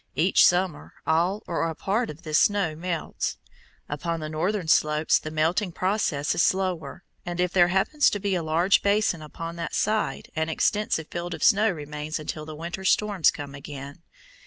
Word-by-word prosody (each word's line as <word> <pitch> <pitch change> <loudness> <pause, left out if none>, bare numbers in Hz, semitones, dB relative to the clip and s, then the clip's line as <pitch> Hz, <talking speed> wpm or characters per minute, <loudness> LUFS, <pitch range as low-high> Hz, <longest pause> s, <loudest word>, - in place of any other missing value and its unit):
Each 165 +7 +5
summer 180 -3 0
all 175 +6 +1
or 165 -1 -1
a 160 - -5
part 215 +8 -1
of 150 - -9
this 155 -1 +2
snow 200 -6 +2
melts. 170 0 -3 0.5
Upon 165 +3 -3
the 155 -1 -5
northern 175 +4 -1
slopes 150 0 +3
the 155 - -6
melting 165 +5 0
process 185 -7 0
is - - +1
slower, 185 -4 -1 0.2
and 175 0 -5
if 180 0 +1
there 175 -2 +5
happens 195 - +3
to 205 - -3
be 200 0 -1
a 180 - 0
large 165 +5 +3
basin 200 -4 +1
upon 165 +2 -7
that 165 -2 -4
side, 215 0 -1
an 160 0 -1
extensive 160 -1 0
field 175 0 -4
of - - -6
snow 215 0 +5
remains 150 -2 -4
until 155 0 -6
the 155 - -7
winter 170 +4 -6
storms 200 -2 +3
come 145 -2 -6
again. 140 +2 -9
170 Hz, 180 wpm, -25 LUFS, 155-190 Hz, 0.5 s, Each